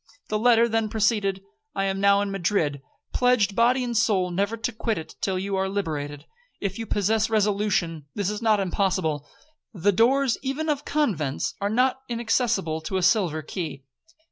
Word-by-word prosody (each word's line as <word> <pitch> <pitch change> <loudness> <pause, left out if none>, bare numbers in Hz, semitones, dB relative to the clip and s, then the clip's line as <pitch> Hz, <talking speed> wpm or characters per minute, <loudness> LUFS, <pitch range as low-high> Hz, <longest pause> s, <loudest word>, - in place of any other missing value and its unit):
The 215 - 0
letter 235 0 +5
then 225 -1 0
proceeded. 205 -3 0 0.3
'I 195 - 0
am 195 0 -1
now 200 0 +5
in 205 -1 -2
Madrid, 170 -7 0 0.3
pledged 245 -5 +2
body 250 +2 +3
and 240 -1 -3
soul 205 -5 +2
never 200 +5 -1
to 225 +3 -2
quit 225 0 -2
it 160 - -7
till 190 -1 0
you 195 +1 -2
are 190 0 0
liberated. 150 -7 -4 0.3
If 200 +1 -3
you 225 - -4
possess 215 +2 +1
resolution, 200 -7 0
this 205 -1 -1
is 210 +2 -5
not 220 -2 +3
impossible,—the 190 - -2
doors 250 +5 +3
even 280 +4 -2
of 290 -1 -1
convents 190 - -1
are 200 - 0
not 255 +4 +2
inaccessible 225 -8 0
to 190 +4 -3
a 185 - -1
silver 175 -7 +2
key. 155 -4 -5
205 Hz, 170 wpm, -25 LUFS, 185-230 Hz, 0.3 s, letter